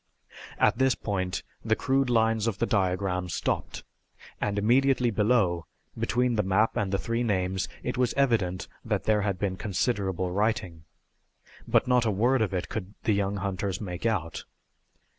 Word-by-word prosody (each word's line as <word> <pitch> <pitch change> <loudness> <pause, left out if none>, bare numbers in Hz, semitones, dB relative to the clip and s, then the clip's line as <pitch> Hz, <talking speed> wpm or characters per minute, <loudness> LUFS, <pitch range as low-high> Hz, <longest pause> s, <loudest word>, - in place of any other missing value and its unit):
At - - +3
this 130 -1 +3
point 95 -3 -2 0.2
the 110 0 +2
crude 135 +1 +1
lines 115 -1 +2
of 110 -4 -1
the 115 - +1
diagram 90 -3 0
stopped, - - -2 0.6
and 105 0 -1
immediately 125 +3 +3
below, 105 -6 +2 0.3
between 125 -1 0
the - - +4
map 105 +3 +2
and 100 -2 -1
the 100 - +1
three 115 +4 -2
names, 95 -4 0
it 125 +1 -3
was 125 -2 +1
evident 110 -10 +1 0.2
that - - -1
there 105 -1 +2
had 100 -2 -1
been 95 -2 -2
considerable 95 -3 -1
writing. 100 -5 -1 0.8
But - - +3
not 125 -1 +3
a - - +3
word 120 +5 +2
of 105 -4 +1
it 90 -2 -2
could 105 -1 -6
the 110 - +2
young 100 0 0
hunters 95 -1 -2
make 90 +1 -3
out. 85 -8 -2
105 Hz, 160 wpm, -27 LUFS, 95-115 Hz, 0.8 s, the